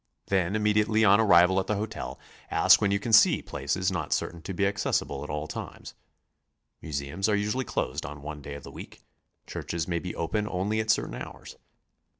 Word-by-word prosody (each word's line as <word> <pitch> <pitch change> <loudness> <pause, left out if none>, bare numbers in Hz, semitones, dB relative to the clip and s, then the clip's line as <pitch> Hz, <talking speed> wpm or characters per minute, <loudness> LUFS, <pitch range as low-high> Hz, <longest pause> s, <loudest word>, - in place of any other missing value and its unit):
Then 95 0 +1
immediately 110 +1 +2
on 100 +1 +6
arrival 95 -3 +5
at 95 - -3
the 105 - 0
hotel, 105 +2 -5 0.3
ask - - +5
when 100 - +2
you 100 - +2
can 110 +2 -4
see - - +6
places 70 +7 -2
not 85 -5 -2
certain 85 -1 -3
to 90 - -6
be 100 - +1
accessible 95 -7 -1
at 75 - -8
all 75 +1 -3
times. - - -8 0.9
Museums 75 +6 -3
are 105 - +3
usually 105 +6 -1
closed - - -2
on 70 +1 -8
one 75 0 -7
day 70 0 -7
of 70 - -10
the - - -10
week; - - -11 0.4
churches 85 -2 -4
may 85 -1 -1
be 90 +1 -6
open 105 +6 -1
only 100 +4 -1
at 110 0 -2
certain 115 - +1
hours. - - -9
95 Hz, 190 wpm, -27 LUFS, 80-105 Hz, 0.9 s, on